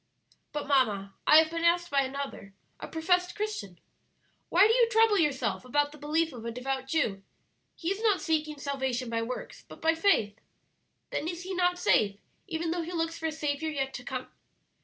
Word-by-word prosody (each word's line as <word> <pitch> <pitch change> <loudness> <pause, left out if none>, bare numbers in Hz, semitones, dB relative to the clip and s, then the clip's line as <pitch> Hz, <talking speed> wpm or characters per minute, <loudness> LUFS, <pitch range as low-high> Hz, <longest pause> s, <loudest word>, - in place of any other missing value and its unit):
"But, 295 0 -3
mamma, 215 -9 +1
I 305 - +9
have 320 0 +5
been 335 0 -3
asked 345 0 +3
by 280 -1 +4
another, 270 -7 -5 0.2
a - - -6
professed 360 +2 +1
Christian, 410 - -4 0.7
'Why 365 +4 +6
do 450 - +3
you 475 -1 +4
trouble 445 -3 +4
yourself 295 -6 0
about 290 +3 +1
the 300 - -13
belief 315 +2 0
of 235 -3 -9
a 235 - -3
devout 265 +2 -3
Jew? 230 -10 0 0.5
he 335 +2 -2
is 395 +2 -3
not 425 -4 +3
seeking 310 -2 -1
salvation 265 -4 -2
by 230 0 0
works, 245 +2 -6
but - - -12
by 325 0 +3
faith; 275 - +2 0.7
then 315 - -2
is 345 +1 -4
he 380 +1 -5
not 355 -1 +2
safe, 205 - +2 0.3
even 330 -2 -2
though 345 0 -1
he 335 +2 -6
looks 330 0 -2
for 320 - -1
a - - -1
Saviour 305 0 -2
yet 270 -3 -2
to 250 - -7
come?' 255 0 -5
305 Hz, 195 wpm, -29 LUFS, 260-340 Hz, 0.7 s, I